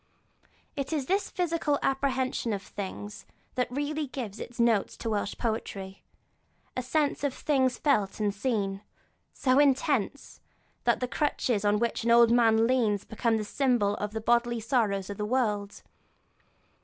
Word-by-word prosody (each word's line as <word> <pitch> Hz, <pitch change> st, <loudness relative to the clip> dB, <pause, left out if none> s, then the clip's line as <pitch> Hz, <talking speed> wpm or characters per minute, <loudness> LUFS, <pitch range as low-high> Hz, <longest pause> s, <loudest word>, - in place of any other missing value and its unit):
It 275 Hz, -1 st, -3 dB
is 295 Hz, -4 st, -1 dB
this 390 Hz, +7 st, +1 dB
sharp -, -, -13 dB
physical 335 Hz, -5 st, +1 dB
apprehension 265 Hz, -3 st, 0 dB
of 200 Hz, -1 st, -4 dB
things 205 Hz, +1 st, -7 dB, 0.3 s
that 250 Hz, -1 st, -1 dB
really 290 Hz, +3 st, -2 dB
gives 235 Hz, -6 st, -6 dB
its 240 Hz, -, -8 dB
note 230 Hz, -4 st, +3 dB
to 225 Hz, -, -5 dB
Welsh 205 Hz, -1 st, -1 dB
poetry; 200 Hz, -4 st, -4 dB, 0.7 s
a 255 Hz, -, -1 dB
sense 290 Hz, +3 st, 0 dB
of 280 Hz, -2 st, 0 dB
things 260 Hz, -4 st, +1 dB
felt 210 Hz, -10 st, +1 dB
and 205 Hz, -1 st, +1 dB
seen, 200 Hz, -3 st, -1 dB, 0.5 s
so 260 Hz, -1 st, +2 dB
intense, 280 Hz, -2 st, +1 dB, 0.4 s
that -, -, +2 dB
the 250 Hz, -, 0 dB
crutch 285 Hz, -1 st, -1 dB
on 205 Hz, 0 st, +3 dB
which 235 Hz, 0 st, -1 dB
an 235 Hz, -, 0 dB
old 235 Hz, 0 st, +6 dB
man 225 Hz, -2 st, +4 dB
leans 230 Hz, -5 st, +1 dB
becomes 225 Hz, 0 st, 0 dB
the 215 Hz, -, -3 dB
symbol 240 Hz, -4 st, +1 dB
of -, -, -7 dB
all -, -, -20 dB
the 220 Hz, -, -3 dB
bodily 240 Hz, +1 st, +2 dB
sorrow 225 Hz, -3 st, +1 dB
of 200 Hz, -, -6 dB
the 210 Hz, -, -2 dB
world. 210 Hz, -3 st, -1 dB
235 Hz, 160 wpm, -28 LUFS, 210-270 Hz, 0.7 s, old